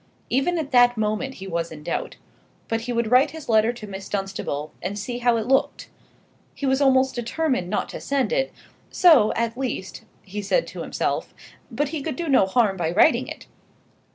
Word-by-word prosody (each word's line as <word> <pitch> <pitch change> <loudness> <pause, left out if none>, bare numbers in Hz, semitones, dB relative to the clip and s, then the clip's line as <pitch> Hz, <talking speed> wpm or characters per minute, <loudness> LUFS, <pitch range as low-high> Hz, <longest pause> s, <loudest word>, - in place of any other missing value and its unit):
Even 275 +8 +1
at 300 -3 -3
that 245 -1 +5
moment 215 +5 -1
he 195 - -9
was 170 -2 -3
in 150 -1 -10
doubt. - - -3 0.5
But 225 0 -1
he 245 +2 -4
would 235 -1 -1
write 260 +4 +5
his 320 -1 -10
letter 220 0 +4
to 235 -3 -9
Miss 195 -1 -8
Dunstable 190 -7 -4
and 195 +3 -4
see 240 +4 -4
how 240 -1 +3
it 220 - -2
looked. 265 +2 0 0.7
He 280 - -4
was 265 +1 +2
almost 265 -1 +4
determined 240 - -1
not 210 - -1
to - - -7
send 280 - 0
it; - - 0 0.4
so, 300 -12 +5
at 230 0 -1
least, 250 -8 -4 0.2
he 205 +2 -6
said 355 - +1
to - - -7
himself: - - -2 0.3
but 295 -1 -1
he 315 -1 -4
could 310 +2 -3
do 345 -1 -4
no 260 -9 +4
harm 205 -2 +2
by 165 -3 -1
writing 215 - +4
it. - - -9
240 Hz, 195 wpm, -23 LUFS, 205-270 Hz, 0.7 s, that